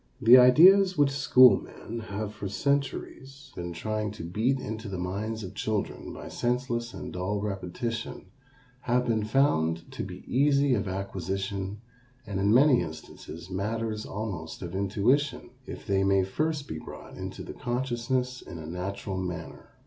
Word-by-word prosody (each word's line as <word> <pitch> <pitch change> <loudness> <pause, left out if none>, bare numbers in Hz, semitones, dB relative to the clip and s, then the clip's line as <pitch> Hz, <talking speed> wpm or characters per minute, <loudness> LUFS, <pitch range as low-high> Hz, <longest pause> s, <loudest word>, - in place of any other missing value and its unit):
The 115 +4 +8
ideas 185 +9 +7
which 145 -1 +4
school 130 -3 +6
men 115 +1 -8
have 105 +1 -4
for 100 -2 -5
centuries 140 +2 -2
been 85 0 -5
trying 105 +4 -2
to 85 - -8
beat 110 +10 0
into 110 -2 -5
the 95 - -4
minds 105 +5 -3
of 95 +1 -7
children 105 0 -3
by - - -8
senseless 120 -1 -1
and - - -7
dull 95 +3 -2
repetition 105 +3 -4 0.5
have 125 0 +1
been 110 -2 +1
found 85 - +1
to - - -4
be - - -8
easy 140 +1 +3
of 100 -4 0
acquisition 95 +1 -3 0.4
and 100 -3 -3
in 100 +1 +3
many 130 +1 +6
instances 80 +2 -8
matters 110 +3 -2
almost 95 -7 -5
of 85 0 -6
intuition 105 +9 +1 0.2
if - - -8
they 95 0 +2
may 95 -1 +3
first 150 +8 -2
be 80 - -5
brought - - -10
into - - -6
the - - -7
consciousness 125 0 -2
in 85 - -9
a 80 - -8
natural 95 +3 -4
manner. 90 -2 -6
110 Hz, 155 wpm, -28 LUFS, 95-125 Hz, 0.5 s, The